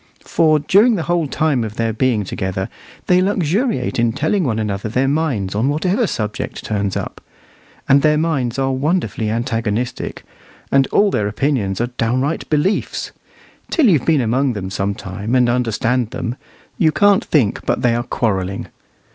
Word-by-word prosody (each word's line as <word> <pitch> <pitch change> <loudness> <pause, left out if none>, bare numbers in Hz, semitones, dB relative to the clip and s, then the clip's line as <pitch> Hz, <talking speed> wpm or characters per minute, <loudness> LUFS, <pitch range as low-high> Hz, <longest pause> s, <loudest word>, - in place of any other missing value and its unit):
For 155 -2 +3
during 205 - +4
the 170 - -2
whole 175 -2 0
time 140 -4 0
of 110 -1 -6
their 115 -1 -1
being 115 -2 +1
together 95 0 -3 0.4
they 180 0 +4
luxuriate 185 - 0
in 115 -1 +2
telling 155 - 0
one 120 -7 0
another 105 -1 -2
their 130 +4 +1
minds 135 -10 0
on 110 +6 +1
whatever 185 - +1
subject 105 - -4
turns 100 -3 -1
up; - - -6 0.7
and 140 +1 +5
their 150 0 +3
minds 140 -7 -1
are 135 0 +1
wonderfully 135 -5 -1
antagonistic, 115 +1 -2 0.5
and 135 -1 +4
all 205 -1 +3
their 105 - 0
opinions 105 -4 -1
are 120 +1 -1
downright 130 +7 0
beliefs. 160 +7 0 0.6
Till 300 -9 +3
you've 155 -9 +3
been 155 -4 +4
among 125 +3 +1
them 95 -3 -5
some 100 +1 -1
time 100 +6 -4
and 125 -1 +4
understand 120 0 0
them, 115 +1 -4 0.4
you 160 -2 +4
can't 200 +6 +4
think 125 -10 +1
but - - -1
that - - +4
they 115 - +3
are 120 - 0
quarrelling. 100 -6 -2
125 Hz, 165 wpm, -18 LUFS, 110-155 Hz, 0.7 s, and